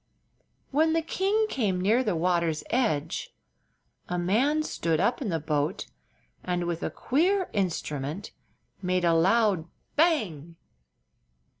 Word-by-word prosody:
When 315 +3 +3
the 330 0 +1
king 395 +6 +1
came 210 - 0
near 220 +7 +3
the 210 -7 0
water's 170 -2 +1
edge 225 - -1 0.7
a 180 - -1
man 245 - +2
stood 165 - -1
up 235 +9 +1
in 235 - -2
the 165 -2 0
boat 150 +4 -1 0.6
and 180 -1 -1
with 170 -1 -3
a - - -1
queer 365 +8 +1
instrument 160 -3 -2 0.5
made 180 -1 0
a 170 - +4
loud 190 0 +3 0.3
"bang!" 200 - +1
185 Hz, 125 wpm, -27 LUFS, 165-265 Hz, 0.7 s, a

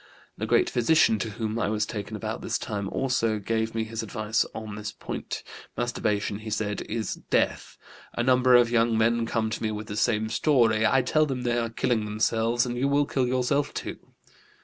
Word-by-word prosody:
The - - -4
great 365 - +3
physician, 160 - +3
to 110 - -2
whom 110 +1 -3
I 105 - 0
was 105 0 0
taken 105 0 -5
about 105 - -4
this - - -1
time, 100 -2 -4
also 120 -4 0
gave 110 +2 -2
me 110 - 0
his 110 0 -4
advice 110 0 -1
on 110 -1 -7
this 105 0 -5
point. - - -6 0.3
'Masturbation,' 105 -4 -1
he 110 0 -7
said, 105 -1 -2
'is 110 -3 -3
death. - - 0 0.4
A 120 - 0
number 125 0 +5
of 120 -1 +5
young 115 -1 +3
men 115 +1 +2
come 110 -1 -1
to - - -4
me 110 - 0
with 105 0 -4
the 105 -1 -6
same 110 0 +1
story. 115 -4 +3
I 135 -1 +3
tell 155 +4 +2
them 130 -3 -3
they 120 -1 +1
are 115 -1 -1
killing 115 -1 0
themselves, 115 +3 +1
and 120 -1 -3
you 135 - +2
will 145 +1 +3
kill 130 -3 0
yourself, 130 +3 0
too.' - - -5
115 Hz, 200 wpm, -26 LUFS, 110-125 Hz, 0.4 s, number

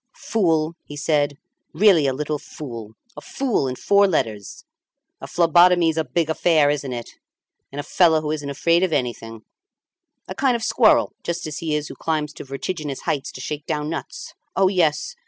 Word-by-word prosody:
"Fool!" 165 -7 0
he 145 - -10
said, 145 -1 0 0.4
"really 170 -4 +5
a 135 - +1
little 150 +1 -3
fool! 115 -9 -9 0.2
A - - -9
fool 250 - -1
in 130 - -3
four 200 +8 +3
letters! 110 - -3 0.6
A - - -7
phlebotomy's 175 -1 +4
a 160 - 0
big 155 +4 -1
affair, 160 -2 +3
isn't 140 -2 -3
it! 120 -1 -6 0.6
And 140 - -7
a - - -3
fellow 165 -2 +3
who 150 -1 -3
isn't 145 -2 -4
afraid 165 +5 +2
of 185 -3 +1
anything; 115 -4 -3 0.8
a - - -5
kind 265 -3 +1
of 230 - -3
squirrel, - - +3
just 170 0 -4
as 155 -2 -5
he 160 -2 -2
is 150 -1 -2
who - - -8
climbs 155 -2 -2
to - - -9
vertiginous 140 +1 -5
heights 140 -2 -2
to 130 - -8
shake 150 +1 -5
down 150 -1 -2
nuts. 485 - -7 0.2
Oh, 190 -1 +4
yes! 180 - 0
155 Hz, 180 wpm, -22 LUFS, 140-170 Hz, 0.8 s, really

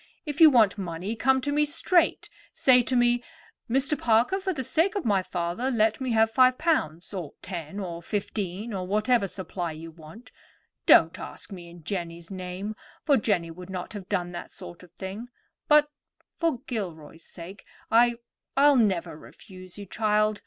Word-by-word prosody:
If 295 +1 -4
you 320 - +11
want 220 -7 +4
money 185 +4 -4
come 265 +3 +2
to 285 +2 -2
me 295 +1 +2
straight. 330 +4 +1 0.3
Say 250 -2 +5
to 255 +1 -1
me, 240 0 +3 0.5
'Mr. 270 +4 +1
Parker, 240 - +2
for 380 0 -2
the 280 -7 -3
sake 335 - +1
of 400 - -2
my 200 -4 +3
father, 180 +7 -2
let 220 -1 +1
me 260 - -2
have 225 0 +3
five 255 +1 +4
pounds,' 175 - -1
or 175 -7 -5
ten, 175 0 -6
or 170 -3 -5
fifteen, 205 +2 -4
or 185 -2 -4
whatever 215 +2 +2
supply 180 -3 -5
you 165 +1 -9
want. 165 +10 -14 0.6
Don't - - +6
ask - - -7
me 175 -3 -9
in 170 -1 -14
Jenny's 170 -1 -5
name, 185 +3 -5 0.3
for 285 - +4
Jenny 195 -8 0
would 180 +2 -11
not 185 +1 -6
have 200 -3 -8
done 180 -3 -1
that 175 - -7
sort 175 - -11
of 180 -2 -16
thing; 195 +6 -7 0.4
but, 300 -1 +5 0.4
for 325 -8 -1
Gilroy's 165 - -6
sake, 180 +4 -11 0.3
I—I'll 240 +4 +2
never 180 -8 +1
refuse 185 +3 -13
you, 205 - -7
child. 215 +1 +1
205 Hz, 170 wpm, -26 LUFS, 180-250 Hz, 0.6 s, you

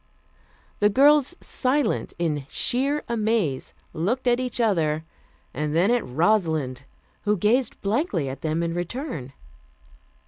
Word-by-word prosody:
The 205 - +4
girls, 290 - +4
silent 265 -2 0
in 150 -5 -1
sheer 275 +4 0
amaze, 220 - -1 0.2
looked 200 +11 -1
at 245 0 +3
each 250 -1 -3
other 160 -9 +1 0.5
and 150 +2 -2
then 185 +7 +4
at 245 -2 +2
Rosalind, 155 -4 0 0.4
who 210 0 +2
gazed 230 +6 +1
blankly 200 - 0
at 135 +1 -6
them 160 +1 -1
in 165 0 -1
return. 175 - -4
205 Hz, 125 wpm, -24 LUFS, 155-245 Hz, 0.5 s, The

